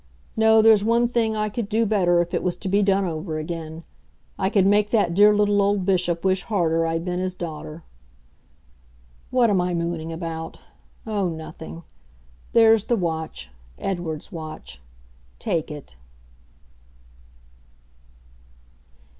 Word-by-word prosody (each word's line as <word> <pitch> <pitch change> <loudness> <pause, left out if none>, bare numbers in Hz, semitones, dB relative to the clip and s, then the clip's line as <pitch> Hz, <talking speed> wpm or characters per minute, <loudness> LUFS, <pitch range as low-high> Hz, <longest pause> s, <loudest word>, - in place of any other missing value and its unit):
No, 220 0 +5
there's 220 -2 +6
one 235 +2 +3
thing 225 -2 0
I 215 0 0
could 210 0 -4
do 225 +1 +2
better 180 -5 +3
if 175 +1 -12
it 170 - 0
was 180 -1 -1
to 195 - -7
be 200 +2 +2
done 195 -1 +2
over 160 -1 -4
again. 160 0 -6 0.5
I 190 - 0
could 195 -2 +3
make 205 +1 +3
that 205 -6 +2
dear 205 +3 +6
little 205 -1 +2
old 200 -1 +1
Bishop 180 -2 0
wish 190 0 +2
harder 165 -6 0
I'd 165 +1 -2
been 180 0 -2
his 185 0 -2
daughter. 155 -1 -7 1.5
What 245 -3 +3
am 190 -3 +2
I 180 0 -1
mooning 170 -1 -3
about? 165 -1 -6 0.5
Oh 205 -4 -1
nothing. 160 +1 -8 0.7
There's 225 -2 +5
the 240 - +1
watch 160 - -4 0.3
Edward's 175 -3 -4
watch. 155 - -9 0.6
Take 165 - -2
it. 145 - -10
180 Hz, 140 wpm, -23 LUFS, 165-210 Hz, 1.5 s, there's